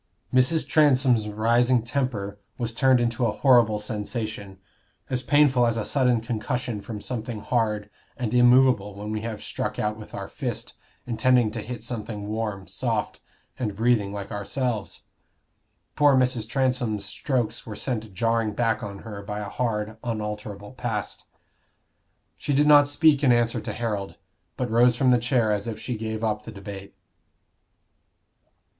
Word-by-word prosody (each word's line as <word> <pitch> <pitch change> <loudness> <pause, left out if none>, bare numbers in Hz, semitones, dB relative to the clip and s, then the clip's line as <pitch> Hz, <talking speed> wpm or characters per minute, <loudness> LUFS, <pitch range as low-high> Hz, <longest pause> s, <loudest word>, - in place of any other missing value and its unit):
Mrs. 130 +6 +3
Transome's 130 -7 +4
rising 120 +3 +2
temper 115 -6 -2 0.2
was 115 -2 -3
turned 130 +1 +4
into 120 +1 0
a 115 - +2
horrible 115 -2 +4
sensation, 105 -1 -5 0.5
as 125 -1 0
painful 135 -4 +4
as 115 0 0
a 110 - -2
sudden 125 -4 +2
concussion 120 -1 -3
from 105 0 -6
something 115 0 -5
hard 105 -2 0 0.3
and 120 -3 -2
immovable 120 -4 +4
when 105 +1 -6
we 110 0 -2
have 110 -2 -5
struck - - -4
out 105 0 -1
with 105 - -10
our - - -5
fist, - - -5 0.3
intending 120 -1 +3
to 115 0 -4
hit 120 0 -7
something 110 -3 -5
warm, 105 -3 -3
soft, - - -2 0.4
and 105 -5 -2
breathing 110 -2 +2
like 100 -1 -6
ourselves. 110 +1 -3 0.9
Poor 145 -2 +5
Mrs. 125 -4 +1
Transome's 125 -6 0
strokes 120 +3 -2
were 105 - -6
sent 110 -1 -3
jarring 115 +2 0
back 115 0 0
on 100 -4 -6
her 105 -3 -7
by 105 +1 -5
a 105 -1 -4
hard 110 -2 -2
unalterable 105 -2 -5
past. 120 -5 -4 1.1
She 145 - -2
did 145 +2 +4
not 145 -1 +7
speak 145 0 +3
in 130 - +5
answer 120 -1 +2
to - - -5
Harold, 105 -5 -3 0.4
but 125 -3 -2
rose 120 +1 +5
from 130 +1 +3
the 125 - +5
chair 120 -2 +1
as 105 +1 -1
if 115 - -4
she 125 - -4
gave 110 0 -4
up 105 -1 0
the 115 - -8
debate. 100 -1 -9
115 Hz, 155 wpm, -25 LUFS, 105-125 Hz, 1.1 s, not